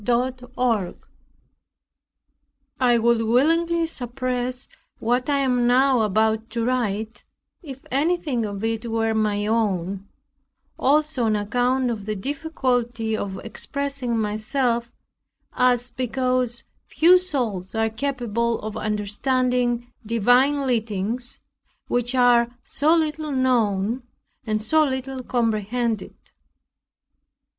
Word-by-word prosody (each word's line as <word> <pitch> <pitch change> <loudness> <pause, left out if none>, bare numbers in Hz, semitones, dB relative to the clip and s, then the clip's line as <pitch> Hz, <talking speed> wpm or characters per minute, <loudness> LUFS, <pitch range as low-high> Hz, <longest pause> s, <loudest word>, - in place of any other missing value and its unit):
CHAPTER 250 +2 0
4 225 -7 0 1.8
I 245 -2 +4
would 235 0 +3
willingly 330 +9 +2
suppress 250 -2 -3 0.3
what 245 +4 0
I 285 - +3
am 250 -2 +2
now 255 0 +4
about 220 +2 +1
to 230 0 -2
write 225 -3 -2 0.4
if 270 -6 -9
anything 290 -3 0
of 205 -1 -5
it 225 +1 -2
were 225 0 0
my 210 -1 0
own, 200 -3 -1 0.7
also 295 -2 +2
on 215 -1 +2
account 245 +5 +1
of 210 -3 -6
the 215 - -1
difficulty 245 -3 -1
of 195 -2 -4
expressing 275 +1 -3
myself 235 +3 -1 0.6
as 250 -1 +2
because 255 -1 -1 0.2
few 355 +3 +5
souls 230 - -3
are 225 0 +2
capable 235 -2 -1
of 215 0 -5
understanding 240 +3 0
divine 245 +6 +3
leadings 230 0 -1 0.5
which 245 +1 0
are 245 -2 +5 0.2
so 310 +4 +2
little 310 -1 -1
known, 235 -4 +1 0.5
and 215 0 +1
so 315 +8 +4
little 265 -1 -3
comprehended. 230 -1 -1
245 Hz, 105 wpm, -23 LUFS, 220-260 Hz, 1.8 s, few